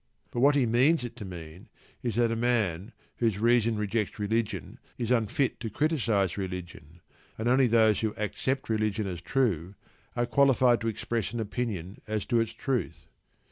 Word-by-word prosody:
But 120 Hz, -, -3 dB
what 140 Hz, +3 st, +5 dB
he 135 Hz, -3 st, +3 dB
means 125 Hz, +6 st, +3 dB
it 120 Hz, -1 st, -6 dB
to 105 Hz, -, -7 dB
mean 85 Hz, -2 st, -10 dB, 0.3 s
is 120 Hz, -4 st, -2 dB
that 120 Hz, -1 st, +2 dB
a -, -, 0 dB
man 110 Hz, -5 st, 0 dB, 0.3 s
whose 115 Hz, -5 st, +1 dB
reason 115 Hz, 0 st, +3 dB
rejects 105 Hz, -1 st, -1 dB
religion 105 Hz, -2 st, -2 dB, 0.2 s
is 120 Hz, 0 st, -2 dB
unfit 125 Hz, +3 st, +1 dB
to 115 Hz, -1 st, -4 dB
criticise 115 Hz, -, 0 dB
religion, 85 Hz, -4 st, -7 dB, 0.4 s
and 110 Hz, -, -4 dB
that -, -, +4 dB
only 130 Hz, 0 st, +5 dB
those 110 Hz, -3 st, +4 dB
who 110 Hz, -2 st, -1 dB
accept 130 Hz, +5 st, -2 dB
religion 110 Hz, -1 st, 0 dB
as 90 Hz, -3 st, -5 dB
true 100 Hz, -, 0 dB, 0.4 s
are 120 Hz, 0 st, +1 dB
qualified 125 Hz, -2 st, +4 dB
to 115 Hz, -, -2 dB
express 115 Hz, 0 st, -2 dB
an 120 Hz, -, -3 dB
opinion 105 Hz, -4 st, -4 dB
as 110 Hz, -2 st, -2 dB
to 120 Hz, -2 st, +2 dB
its 115 Hz, -1 st, 0 dB
truth. 110 Hz, -, -3 dB
115 Hz, 175 wpm, -28 LUFS, 100-120 Hz, 0.4 s, what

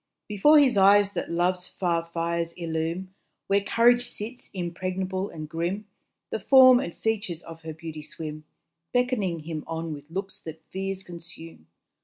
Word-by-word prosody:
Before 210 Hz, +10 st, +5 dB
his 270 Hz, -7 st, +5 dB
eyes 200 Hz, +1 st, +6 dB
that -, -, -4 dB
love's 180 Hz, +1 st, 0 dB
far 170 Hz, -3 st, -1 dB
fires 170 Hz, 0 st, -1 dB
illume 170 Hz, +2 st, -3 dB, 0.3 s
Where 200 Hz, +1 st, +2 dB
courage 240 Hz, +4 st, +4 dB
sits, 240 Hz, 0 st, -6 dB
impregnable 185 Hz, +1 st, -3 dB
and 155 Hz, -1 st, -7 dB
grim 175 Hz, +7 st, -3 dB, 0.5 s
The -, -, -1 dB
form 255 Hz, +3 st, +8 dB
and 170 Hz, -, -5 dB
features 205 Hz, -7 st, -2 dB
of 165 Hz, 0 st, -11 dB
her 160 Hz, -1 st, -6 dB
beauty 160 Hz, -1 st, -7 dB
swim, 155 Hz, 0 st, -7 dB, 0.5 s
Beckoning 235 Hz, -10 st, +1 dB
him 155 Hz, -1 st, -5 dB
on 165 Hz, -1 st, -3 dB
with 145 Hz, 0 st, -10 dB
looks 195 Hz, +3 st, -5 dB
that 160 Hz, 0 st, -9 dB
fears 195 Hz, 0 st, -3 dB
consume. 165 Hz, -, -12 dB
180 Hz, 150 wpm, -26 LUFS, 165-200 Hz, 0.5 s, form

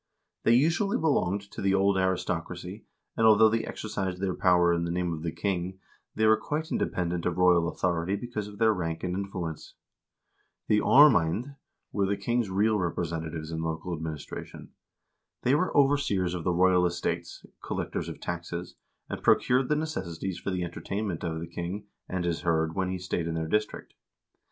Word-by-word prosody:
They 115 Hz, -, +4 dB
usually 165 Hz, -, +2 dB
belonged 100 Hz, -, +1 dB
to -, -, -7 dB
the 95 Hz, -1 st, +2 dB
old 100 Hz, 0 st, +3 dB
aristocracy, 95 Hz, -1 st, -2 dB, 0.3 s
and 110 Hz, -, +4 dB
although 110 Hz, 0 st, +7 dB
they 115 Hz, +1 st, 0 dB
exercised 95 Hz, -4 st, -4 dB
their 95 Hz, -1 st, -1 dB
power 90 Hz, -1 st, +4 dB
in 85 Hz, 0 st, 0 dB
the 85 Hz, -, -2 dB
name 90 Hz, 0 st, -1 dB
of 80 Hz, -, -5 dB
the 85 Hz, 0 st, -2 dB
king, 95 Hz, 0 st, -2 dB, 0.4 s
they 110 Hz, -, +2 dB
were 110 Hz, 0 st, +6 dB
quite 155 Hz, +2 st, -3 dB
independent 85 Hz, -1 st, -1 dB
of 90 Hz, -1 st, -2 dB
royal 90 Hz, -2 st, +4 dB
authority 85 Hz, +1 st, 0 dB
because 105 Hz, -1 st, -4 dB
of 105 Hz, 0 st, -11 dB
their 110 Hz, 0 st, +4 dB
rank 80 Hz, -4 st, -3 dB
and 90 Hz, 0 st, -1 dB
influence. 90 Hz, -5 st, -5 dB, 0.9 s
The 105 Hz, -, +4 dB
aarmcend 125 Hz, -, +5 dB, 0.4 s
were 100 Hz, -2 st, +1 dB
the 100 Hz, +1 st, 0 dB
king's 120 Hz, +1 st, 0 dB
real 105 Hz, +3 st, +2 dB
representatives 80 Hz, -2 st, -3 dB
in 80 Hz, 0 st, -3 dB
local 80 Hz, +2 st, -3 dB
administration. 80 Hz, -2 st, -7 dB, 0.7 s
They 125 Hz, -, +3 dB
were 155 Hz, +6 st, +1 dB
overseers 135 Hz, -11 st, +2 dB
of 90 Hz, -2 st, -4 dB
the 90 Hz, -, +2 dB
royal 90 Hz, 0 st, +4 dB
estates, 85 Hz, 0 st, -4 dB, 0.2 s
collectors -, -, -3 dB
of -, -, -8 dB
taxes, 85 Hz, 0 st, -5 dB, 0.3 s
and -, -, -5 dB
procured 125 Hz, +1 st, +3 dB
the 150 Hz, -, +3 dB
necessaries 95 Hz, -, -3 dB
for -, -, -4 dB
the 90 Hz, -2 st, -1 dB
entertainment 95 Hz, +2 st, -4 dB
of 80 Hz, -2 st, -2 dB
the 85 Hz, -, -4 dB
king 85 Hz, +4 st, -5 dB, 0.2 s
and 95 Hz, -2 st, -2 dB
his 85 Hz, -1 st, -1 dB
hird 80 Hz, -2 st, +1 dB
when 95 Hz, 0 st, -1 dB
he 95 Hz, -, -2 dB
stayed 90 Hz, -2 st, -3 dB
in 80 Hz, -, -2 dB
their 80 Hz, -1 st, -2 dB
district. 105 Hz, +5 st, -2 dB
90 Hz, 175 wpm, -28 LUFS, 85-105 Hz, 0.9 s, although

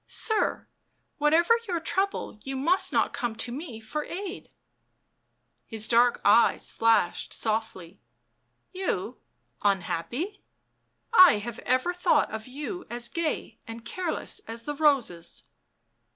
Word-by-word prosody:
Sir, 440 Hz, -2 st, 0 dB, 0.5 s
whatever 320 Hz, +7 st, +4 dB
your 350 Hz, -3 st, -1 dB
trouble 380 Hz, -, -2 dB
you 270 Hz, +2 st, -5 dB
must 340 Hz, +8 st, +3 dB
not -, -, +1 dB
come 240 Hz, -4 st, -3 dB
to 230 Hz, +2 st, -3 dB
me 255 Hz, -4 st, -6 dB
for 260 Hz, +8 st, -4 dB
aid." 375 Hz, +3 st, -6 dB, 1.2 s
His 220 Hz, -1 st, -1 dB
dark 240 Hz, +1 st, +4 dB
eyes 235 Hz, -, +4 dB
flashed 225 Hz, -6 st, +2 dB
softly. 215 Hz, -5 st, -3 dB, 0.3 s
" -, -, -47 dB
You 380 Hz, -, -2 dB, 0.2 s
— -, -, -41 dB
unhappy? 205 Hz, -, -1 dB, 0.7 s
I 370 Hz, -5 st, +9 dB
have 230 Hz, +2 st, -6 dB
ever 255 Hz, +8 st, +1 dB
thought 355 Hz, -4 st, +2 dB
of 220 Hz, +1 st, -6 dB
you 295 Hz, +8 st, -6 dB
as 240 Hz, 0 st, -1 dB
gay 310 Hz, -7 st, -3 dB
and 230 Hz, 0 st, -9 dB
careless 365 Hz, -, -3 dB
as 230 Hz, 0 st, -5 dB
the 295 Hz, -, -3 dB
roses." 270 Hz, -, +1 dB
255 Hz, 125 wpm, -27 LUFS, 225-335 Hz, 1.2 s, I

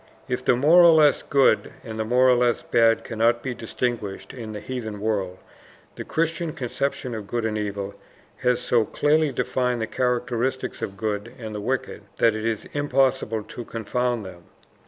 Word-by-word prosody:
If 125 Hz, 0 st, -2 dB
the -, -, +4 dB
more 155 Hz, +8 st, +6 dB
or 170 Hz, -1 st, +8 dB
less 150 Hz, -2 st, +5 dB
good, 135 Hz, -5 st, +2 dB
and 110 Hz, -1 st, -7 dB
the -, -, +1 dB
more 125 Hz, +3 st, +3 dB
or 130 Hz, -, +6 dB
less 120 Hz, -1 st, +2 dB
bad 115 Hz, -1 st, +3 dB
cannot 115 Hz, +1 st, +1 dB
be 130 Hz, -, -2 dB
distinguished 115 Hz, -3 st, -4 dB
in 115 Hz, -4 st, -7 dB
the 105 Hz, -, -6 dB
heathen 110 Hz, -4 st, -5 dB
world, 100 Hz, -4 st, -2 dB, 0.6 s
the -, -, -6 dB
Christian 165 Hz, 0 st, -1 dB
conception 135 Hz, -2 st, -3 dB
of 105 Hz, -3 st, -6 dB
good 120 Hz, 0 st, -2 dB
and 110 Hz, -1 st, -1 dB
evil 100 Hz, -1 st, -3 dB, 0.4 s
has 125 Hz, -1 st, +1 dB
so 120 Hz, -2 st, +2 dB
clearly 150 Hz, +5 st, +2 dB
defined 125 Hz, -1 st, -1 dB
the 110 Hz, -, -1 dB
characteristics 125 Hz, +1 st, -1 dB
of 95 Hz, -, -3 dB
the -, -, -20 dB
good 105 Hz, +1 st, -3 dB
and 110 Hz, -3 st, -7 dB
the 105 Hz, -, -4 dB
wicked, 130 Hz, +5 st, -2 dB
that 115 Hz, -2 st, +3 dB
it 110 Hz, 0 st, -4 dB
is 115 Hz, -2 st, -2 dB
impossible 135 Hz, -6 st, +1 dB
to 120 Hz, -, -8 dB
confound 115 Hz, +1 st, -2 dB
them. 90 Hz, -2 st, -11 dB
120 Hz, 180 wpm, -24 LUFS, 110-130 Hz, 0.6 s, or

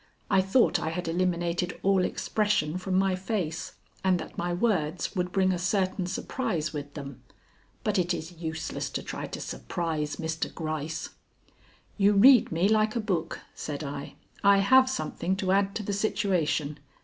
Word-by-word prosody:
I 190 Hz, -, +5 dB
thought 190 Hz, -1 st, +3 dB
I 160 Hz, -, -2 dB
had 170 Hz, +1 st, -4 dB
eliminated 175 Hz, 0 st, -1 dB
all 195 Hz, -1 st, +4 dB
expression 205 Hz, -6 st, 0 dB
from 185 Hz, 0 st, -2 dB
my 190 Hz, -1 st, +2 dB
face, 185 Hz, -4 st, -3 dB, 0.3 s
and 185 Hz, -1 st, +3 dB
that 160 Hz, -, -8 dB
my 175 Hz, 0 st, -2 dB
words 180 Hz, -3 st, 0 dB
would 180 Hz, -1 st, -1 dB
bring 190 Hz, -1 st, +3 dB
a 180 Hz, -, -1 dB
certain 185 Hz, 0 st, 0 dB
surprise 185 Hz, -, -2 dB
with 145 Hz, -1 st, -6 dB
them. 140 Hz, -4 st, -8 dB, 0.6 s
But 210 Hz, -2 st, +1 dB
it 175 Hz, 0 st, +1 dB
is 170 Hz, -1 st, -3 dB
useless 160 Hz, -2 st, -4 dB
to -, -, -3 dB
try -, -, -5 dB
to -, -, -6 dB
surprise 160 Hz, -3 st, -3 dB
Mr. 160 Hz, -1 st, -3 dB
Gryce. 155 Hz, -1 st, -4 dB, 0.9 s
"You 200 Hz, +1 st, +5 dB
read 240 Hz, +4 st, +7 dB
me 170 Hz, +4 st, +2 dB
like 215 Hz, +1 st, +2 dB
a -, -, +1 dB
book," 175 Hz, -7 st, -2 dB
said 150 Hz, 0 st, -5 dB
I; 140 Hz, 0 st, -6 dB, 0.3 s
"I 200 Hz, 0 st, +7 dB
have 260 Hz, +6 st, +5 dB
something 190 Hz, -8 st, -2 dB
to 190 Hz, -1 st, -1 dB
add 195 Hz, +1 st, +2 dB
to 220 Hz, -, -2 dB
the 205 Hz, -, -2 dB
situation. 180 Hz, -8 st, 0 dB
180 Hz, 165 wpm, -28 LUFS, 160-200 Hz, 0.9 s, read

